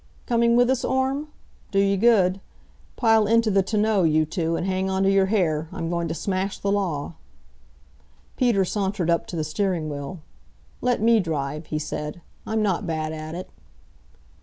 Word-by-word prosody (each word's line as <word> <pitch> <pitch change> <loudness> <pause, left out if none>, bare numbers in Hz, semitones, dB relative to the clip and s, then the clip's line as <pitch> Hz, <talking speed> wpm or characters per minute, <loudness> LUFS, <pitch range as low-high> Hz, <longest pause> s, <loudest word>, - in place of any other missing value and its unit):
"Coming 235 -1 +3
with 245 +1 +4
us, 260 -1 0
Orme? 265 +3 0 0.4
Do 195 - -2
you 195 0 +3
good. 195 -3 +3 0.5
Pile 225 -3 +3
into 230 0 +3
the 195 0 +4
tonneau, 210 +1 +1
you 155 -2 +3
two, 165 +1 -2
and 175 - -2
hang 190 0 -1
on 190 0 0
to 195 - +4
your 195 -1 +3
hair. 165 -7 0
I'm 165 0 -4
going 170 -1 -1
to 160 - -3
smash 190 +4 -2
the 200 - -1
law." 175 -7 -1 1.2
Peter 235 -7 +2
sauntered 190 -3 -1
up 170 - 0
to - - -6
the 160 - -1
steering 160 0 -1
wheel. 145 +5 -6 0.6
"Let 245 -3 +1
me 230 0 +5
drive," 155 -3 -3
he 155 - -2
said. 150 +2 -5 0.3
"I'm 220 0 0
not 195 -1 0
bad 155 -1 -2
at 155 +1 -6
it." 180 - -7
190 Hz, 175 wpm, -24 LUFS, 160-215 Hz, 1.2 s, me